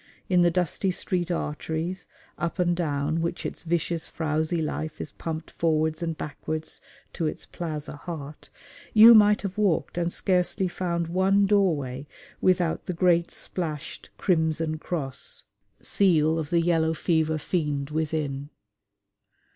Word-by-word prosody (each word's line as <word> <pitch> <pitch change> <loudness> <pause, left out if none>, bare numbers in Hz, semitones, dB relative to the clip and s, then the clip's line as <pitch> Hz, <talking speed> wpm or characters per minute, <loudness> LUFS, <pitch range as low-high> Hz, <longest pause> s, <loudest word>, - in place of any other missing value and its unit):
In 180 -2 +4
the 175 - +5
dusty 180 +2 0
street 180 -1 -1
arteries, 165 +2 -3 0.3
up 170 +1 -3
and 175 -1 +2
down 155 -1 -1
which 170 +1 -3
its - - -5
vicious, 170 0 -1
frowsy 160 +1 -1
life 155 0 -3
is 145 - -5
pumped 160 +1 -5
forwards 160 0 0
and 165 -2 -2
backwards 155 +1 -5 0.3
to 165 - -1
its - - -5
plaza 155 -3 -5
heart, 150 -2 -8 0.5
you 225 +2 +10
might 210 -1 +6
have 195 +1 -4
walked 185 -3 +1
and 170 0 0
scarcely 185 +1 +1
found 175 -1 -2
one 190 +3 +3
doorway 150 -10 +1 0.3
without 180 -3 +1
the 180 - -1
great 170 -1 +3
splashed 155 -6 -4
crimson 160 -2 +1
cross 145 -6 -4 0.4
seal 165 -5 +3
of 150 -2 -4
the 170 -1 +3
yellow 165 -1 +2
fever 160 -1 +1
fiend 150 -3 -2
within. 150 -3 -2
165 Hz, 135 wpm, -26 LUFS, 155-180 Hz, 0.5 s, you